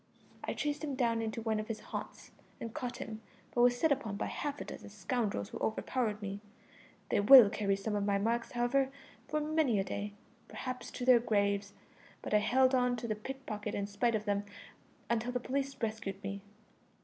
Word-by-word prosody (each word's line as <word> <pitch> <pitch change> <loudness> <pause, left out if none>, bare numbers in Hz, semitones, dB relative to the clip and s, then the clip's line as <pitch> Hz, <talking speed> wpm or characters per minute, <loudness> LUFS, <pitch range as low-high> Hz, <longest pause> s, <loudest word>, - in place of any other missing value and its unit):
I - - -2
chased 295 +1 -2
him 285 -3 -2
down 230 -3 +1
into 225 0 -3
one 220 -1 0
of 215 - -4
his 225 -2 -4
haunts, - - -6 0.3
and 230 -1 -6
caught 245 -1 -4
him, 220 0 -6 0.3
but 240 - +2
was 245 0 +5
set 320 +1 +3
upon 235 -7 0
by - - -1
half 290 -1 -3
a - - -5
dozen - - -8
scoundrels 200 - -2
who - - -7
overpowered 220 -1 -1
me. 200 0 -4 0.7
They - - +2
will 220 0 +10
carry 200 -3 +1
some 210 +2 -3
of 205 - 0
my 200 0 +2
marks, 230 +3 -1
however, 245 +3 +2 0.4
for 305 - 0
many 300 -7 +2
a - - +2
day 205 +1 -4 0.3
perhaps 255 -1 -5
to 245 - -5
their 250 -2 +7
graves; 200 -3 +1 0.5
but - - -4
I 210 - +6
held 255 +5 +3
on 250 -1 +3
to 240 0 -5
the 215 - 0
pick 265 +5 -7
pocket 210 -1 -4
in 200 - -1
spite 220 +3 +1
of 215 0 -2
them 205 -1 0 0.6
until 235 +1 0
the 250 - 0
police 275 +2 -2
rescued 215 -4 -3
me. 200 0 -4
225 Hz, 200 wpm, -33 LUFS, 205-255 Hz, 0.7 s, will